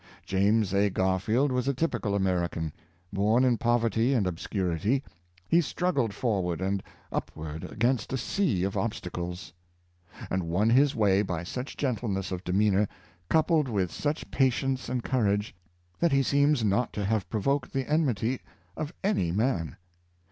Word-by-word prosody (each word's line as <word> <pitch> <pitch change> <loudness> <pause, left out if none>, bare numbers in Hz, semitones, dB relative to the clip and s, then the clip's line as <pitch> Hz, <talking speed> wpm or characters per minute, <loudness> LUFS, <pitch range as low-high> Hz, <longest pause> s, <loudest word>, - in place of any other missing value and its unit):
James 100 +1 +2
A. 100 +1 +3
Garfield 95 +9 +1
was 125 0 0
a 140 - +1
typical 120 -9 -1
Ameri 90 -3 +1
can. 80 -2 -4 0.4
Born 110 +6 +3
in 125 -3 +3
poverty 120 +1 +2
and 110 -6 +2
obscurity, 95 - -1 0.4
he 170 - +4
struggled 145 - 0
for 105 -1 0
ward 90 -2 -2
and 95 +1 -1 0.3
upward 80 0 -5
against 120 +3 0
a 130 - 0
sea 120 - 0
of 100 +1 -1
obstacles, 90 -5 -4 0.8
and 95 -2 -1
won 105 +7 +2
his 140 +3 +4
way 100 -3 +3
by 90 -4 -3
such 125 - -6
gentleness 110 -8 -1
of 90 0 -4
demeanor, 100 +2 +2 0.4
coupled 160 -2 +3
with 95 -6 0
such 150 +1 -3
patience 130 0 +1
and 125 -1 -2
courage, 105 -5 0 0.5
that 170 -2 +3
he 135 0 +4
seems 140 -1 +3
not 105 +3 +1
to 105 - -2
have 110 -1 0
provoked 135 +5 0
the 135 -2 -2
enmity 130 -6 +1 0.3
of 155 -1 -4
any 185 - +1
man. 90 - 0
110 Hz, 150 wpm, -28 LUFS, 95-130 Hz, 0.8 s, he